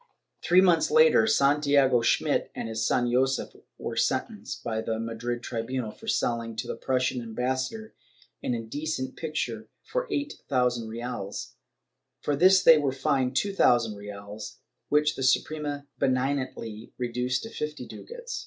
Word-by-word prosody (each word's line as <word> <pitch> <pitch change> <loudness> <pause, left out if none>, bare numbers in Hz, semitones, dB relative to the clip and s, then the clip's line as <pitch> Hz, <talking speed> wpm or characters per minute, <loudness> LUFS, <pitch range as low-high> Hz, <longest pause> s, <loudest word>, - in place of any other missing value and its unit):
Three 180 +1 +5
months 175 -3 +4
later, 470 - +6
Santiago 140 - +4
Schmidt - - +1
and - - -4
his 110 -1 -2
son 120 -1 +1
Josef 130 +2 +1 0.3
were - - -5
sentenced, - - -2
by 110 -1 -2
the 110 0 -2
Madrid 120 +1 -4
tribunal, 115 0 -3
for - - -14
selling 115 -1 0
to 115 +3 -3
the - - -4
Prussian 130 -1 0
ambassador 130 - -3 0.5
an 125 - -1
indecent 130 +3 -4
picture 155 -2 -3 0.2
for - - -2
eight 290 0 -3
thousand 125 -4 +1
reales; 110 -3 -5 0.7
for 145 - -1
this 185 +5 +6
they 160 -2 +8
were 140 -2 +1
fined 130 -1 0
two 200 +7 +1
thousand 120 - +3
reales, 100 +1 -8 0.3
which 150 0 +3
the - - -6
Suprema 145 +2 0
benignantly 130 -4 -1
reduced 125 +1 -1
to 225 - -7
fifty 150 -5 -5
ducats. 480 0 -7
130 Hz, 145 wpm, -27 LUFS, 115-150 Hz, 0.7 s, they